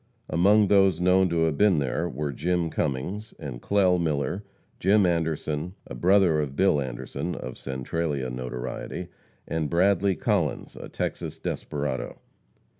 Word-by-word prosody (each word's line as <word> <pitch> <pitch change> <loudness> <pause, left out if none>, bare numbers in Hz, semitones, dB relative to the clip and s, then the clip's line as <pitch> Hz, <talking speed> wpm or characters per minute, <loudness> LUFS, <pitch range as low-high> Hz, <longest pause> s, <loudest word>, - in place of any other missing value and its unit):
Among 100 +5 +5
those 95 -3 +4
known 90 +1 +4
to 85 -1 +1
have 80 -3 0
been 105 -5 +5
there 70 -3 -1
were 75 +2 -3
Jim 85 +4 -1
Cummings 90 +11 -3
and - - -7
Clell 95 -3 +3
Miller, 80 +5 -1 0.4
Jim 100 +2 +4
Anderson, 80 0 -1
a - - -8
brother 90 +4 +4
of 70 -2 -2
Bill 95 -5 +3
Anderson, 65 -3 -4
of 65 - -6
Centralia 65 0 -2
notoriety, 60 0 -5 0.4
and 80 -2 -1
Bradley 95 +2 +3
Collins, - - -1
a - - -8
Texas - - -4
desperado. 70 -3 -3
80 Hz, 135 wpm, -26 LUFS, 70-95 Hz, 0.4 s, Among